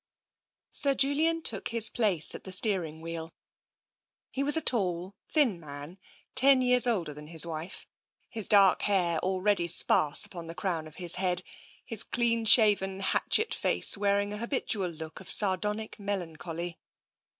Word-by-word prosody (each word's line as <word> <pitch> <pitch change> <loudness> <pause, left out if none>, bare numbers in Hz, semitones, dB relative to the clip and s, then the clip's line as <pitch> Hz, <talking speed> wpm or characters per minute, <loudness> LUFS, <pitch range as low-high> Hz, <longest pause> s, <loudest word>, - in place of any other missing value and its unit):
Sir 280 -2 +5
Julian 315 +5 +1
took 200 -4 -3
his 230 -1 +2
place 200 -9 0
at - - -9
the 190 - -9
steering 180 -6 -1
wheel. 165 0 -7 1.0
He 270 - -3
was 290 +2 +1
a - - +2
tall, 185 -5 -1 0.2
thin 255 - +1
man, 150 +3 -10 0.3
ten 265 -1 +5
years 250 0 +3
older 180 -10 -1
than 150 +1 -11
his 165 0 +3
wife, 165 +2 -7 0.4
his 220 -3 -4
dark 200 -3 +5
hair 180 -5 0
already 185 0 0
sparse 155 -3 +4
upon 170 -3 -9
the 165 - -9
crown 170 -5 -3
of 155 - -15
his 175 -1 -2
head, 180 -1 -1 0.4
his 225 -3 -2
clean 230 -1 -1
shaven 205 -4 +4
hatchet 435 - 0
face - - +3
wearing 200 0 0
an 210 - -6
habitual 225 -6 -2
look 160 -1 -9
of 190 - -11
sardonic 210 +3 0
melancholy. 175 -3 -5
190 Hz, 150 wpm, -28 LUFS, 170-225 Hz, 1.0 s, Sir